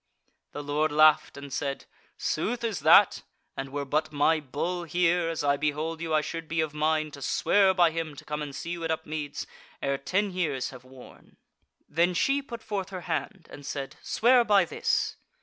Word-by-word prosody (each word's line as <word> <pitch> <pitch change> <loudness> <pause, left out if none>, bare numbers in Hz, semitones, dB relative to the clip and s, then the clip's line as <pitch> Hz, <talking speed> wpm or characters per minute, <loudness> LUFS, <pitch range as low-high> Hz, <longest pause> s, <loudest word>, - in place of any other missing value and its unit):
The 145 - -5
Lord 150 +2 0
laughed 155 -1 +4
and 140 -1 -8
said: 140 -1 -3 0.3
"Sooth 235 +9 -2
is 220 -8 -1
that; - - +6 0.3
and 135 0 -5
were 145 0 -3
but 155 +3 0
my 155 +2 +3
Bull 160 +5 -3
here, 175 +1 +2
as 165 -2 -3
I 140 0 +2
behold 155 +3 -2
you 165 -1 -3
I 155 -1 +3
should 165 +1 -6
be 160 +1 -2
of 155 -2 0
mind 155 0 0
to 140 - -10
swear 195 +7 +3
by 175 -3 +5
him 160 -2 -4
to - - -12
come 150 0 -4
and 145 -2 -5
see 170 - -5
you 170 -1 -4
at 165 - -2
Upmeads 155 -2 -3 0.3
ere 140 0 -1
ten 195 +7 0
years 155 -8 -2
have 125 -1 -12
worn." 130 -1 -16 0.5
Then 170 +4 +1
she 275 +10 +2
put 235 -4 -9
forth 195 -3 -3
her 185 -2 -6
hand 175 +2 -4
and 145 - -10
said: 135 -1 -5
"Swear 245 +1 +4
by 205 -3 +4
this!" 445 +1 -1
155 Hz, 195 wpm, -27 LUFS, 145-180 Hz, 0.5 s, that